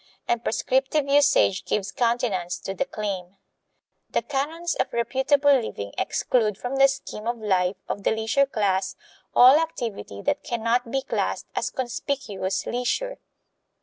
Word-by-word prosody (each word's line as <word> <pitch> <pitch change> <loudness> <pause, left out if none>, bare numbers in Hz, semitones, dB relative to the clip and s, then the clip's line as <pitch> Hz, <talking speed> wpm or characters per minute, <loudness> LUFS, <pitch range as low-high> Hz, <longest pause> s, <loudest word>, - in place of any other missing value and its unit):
And 235 -1 0
prescriptive 270 +5 +1
usage 280 -9 +4
gives 200 -1 -2
countenance 230 -7 0
to 195 - -4
the 275 - -1
claim. 200 -6 -5 0.7
The - - 0
canons 315 +5 -2
of - - 0
reputable 270 +4 +3
living 100 - -2
exclude 215 -5 0
from 250 +4 -4
the 275 0 +7
scheme 230 -5 -5
of 240 0 -1
life 190 -3 +1
of 205 - -3
the - - +1
leisure 225 +5 +2
class 195 -6 0 0.4
all 260 +5 +8
activity 225 - -4
that - - 0
can 235 -2 -3
not 235 +1 +1
be 270 +2 -1
classed - - -2
as - - 0
conspicuous 235 -6 -3
leisure. - - -2
235 Hz, 145 wpm, -25 LUFS, 200-270 Hz, 0.7 s, all